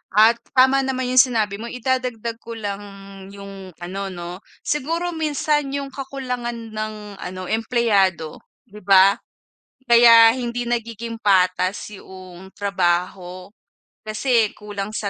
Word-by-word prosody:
At 220 +2 +6 0.2
tama 265 +1 +5
naman 260 -1 -2
yung 255 - +5
sinabi 220 -6 +2
mo, 230 - -6
idadagdag 245 -2 -2
ko 230 - -9
lang 205 -3 -4 0.5
yung 195 -2 -10
ano 195 +3 -5
'no, 175 -1 -7 0.3
siguro 330 +5 -2
minsan 300 -2 0
yung 280 -1 -3
kakulangan 250 -4 -5
ng 215 -2 -6
ano, 185 0 -7
empleyado, 210 -8 +1 0.3
'di 210 +1 -12
ba? 195 +1 +6 0.7
Kaya 235 -1 +8
hindi 245 -1 -3
nagiging 230 -1 -4
patas 185 -1 +1
'yong 185 -1 -12
trabaho 185 -1 -2 0.5
kasi 220 0 +1
kulang 205 -1 -6
sa 210 -2 -3
220 Hz, 120 wpm, -21 LUFS, 195-245 Hz, 0.7 s, Kaya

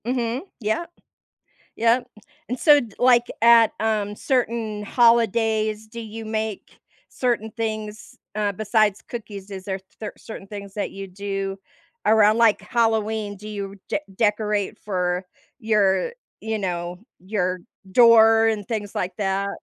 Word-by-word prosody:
Mhm. 245 0 -1 0.2
Yup, 220 +11 -1 0.9
yup, 240 +2 +2 0.4
and 250 - -3
so, 295 -2 +7 0.2
like, 245 -1 +5 0.2
at, 230 -1 +6
um, 210 -2 0
certain 230 -4 -1
holidays, 220 -1 +2
do 235 +2 -9
you 225 0 -7
make 220 -2 -4 0.3
certain 235 -3 -1
things, 215 +1 -5 0.2
uh, 210 -1 0
besides 215 0 +1
cookies? 205 -4 -8
Is 190 -1 -7
there 190 -1 -3 0.2
cer 215 - -5
certain 210 -3 -10
things 200 -1 -8
that 205 - -2
you 195 0 -7
do 195 0 -4 0.5
around, 215 0 +5
like, 230 -2 +4
Halloween? 220 -3 0
Do 210 +2 -10
you 200 -2 -5
de - - 0 0.2
decorate 210 -1 0
for 180 -2 -2 0.3
your, 210 - +2 0.3
you 220 0 -2
know, 175 -2 -3 0.2
your 185 -1 -2 0.3
door 225 0 +7
and 215 -2 -1
things 210 -3 -4
like 180 0 -2
that? 195 0 0
215 Hz, 130 wpm, -23 LUFS, 200-225 Hz, 0.9 s, so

